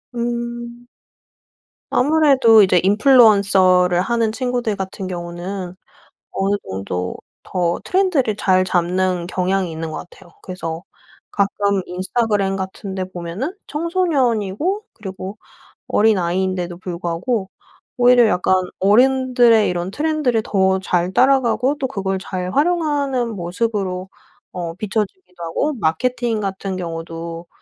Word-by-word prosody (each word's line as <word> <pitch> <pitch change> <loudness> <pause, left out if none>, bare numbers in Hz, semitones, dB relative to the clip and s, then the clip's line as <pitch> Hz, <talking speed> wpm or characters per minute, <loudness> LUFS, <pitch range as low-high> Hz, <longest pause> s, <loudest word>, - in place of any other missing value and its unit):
음. 240 0 -4 1.0
아무래도 270 -6 +5
이제 185 -2 +4
인플루언서를 195 -5 +5
하는 230 +1 0
친구들 245 -2 -2
같은 190 0 -5
경우는 175 +1 -6 0.6
어느 195 +1 0
정도 95 -1 -4 0.3
더 175 -2 -1
트렌드를 350 - +1
잘 185 -2 +2
잡는 180 0 0
경향이 185 0 -1
있는 160 0 -5
것 165 - -7
같아요. 175 - -18
그래서 170 -2 -6 0.5
가끔 200 0 0
인스타그램 195 +1 -1
같은 190 +1 -6
데 190 - -2
보면은 180 - -5
청소년이고 300 - 0
그리고 195 -1 -8 0.5
어린아이인데도 185 -3 +1
불구하고 180 +4 -3 0.5
오히려 245 -1 +6
약간 185 -2 +2 0.2
어른들의 245 +1 +4
이런 175 0 -2
트렌드를 295 -4 0
더 190 -2 +1
잘 180 -1 0
따라가고 260 +1 +3
또 265 - -1
그걸 195 -4 -2
잘 185 -1 -4
활용하는 290 -6 +1
모습으로 185 0 -3 0.4
어 170 -2 -5
비춰지기도 190 -3 -4
하고 225 - -1
마케팅 235 - -1
같은 195 -1 -4
경우도 165 0 -6
195 Hz, 280 characters per minute, -19 LUFS, 180-240 Hz, 1.0 s, 오히려